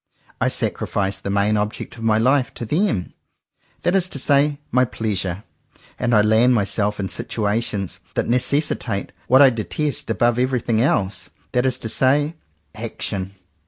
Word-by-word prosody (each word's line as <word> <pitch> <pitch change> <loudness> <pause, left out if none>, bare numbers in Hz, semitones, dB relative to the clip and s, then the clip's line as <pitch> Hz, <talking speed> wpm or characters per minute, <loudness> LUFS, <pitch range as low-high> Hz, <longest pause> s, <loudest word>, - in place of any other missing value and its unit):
I - - +3
sacrifice 95 -1 -1
the 100 - -5
main 100 +2 +2
object 105 +1 -3
of 115 - -11
my 110 -1 +3
Hfe 130 +2 +3
to 120 - -5
them, 155 - 0 0.7
that 175 - +2
is 185 -1 +2
to - - -5
say 145 +2 +2
my 125 - +4
Pleasure; 100 -5 -2 0.6
and 120 -2 +2
I 105 - +5
land 115 +4 +4
myself 105 0 0
in 95 - -1
situations 105 -2 -2 0.2
that - - 0
necessitate 125 -4 0 0.2
what 130 +3 +7
I 135 - +7
detest 145 +6 -3
above 120 0 +2
every 130 0 +1
thing 115 -1 0
else, 100 -7 0 0.2
that 125 +1 +2
is 130 -1 +1
to 115 -3 -5
say 145 +6 +2 0.4
action. 100 -3 -4
115 Hz, 160 wpm, -21 LUFS, 105-130 Hz, 0.7 s, what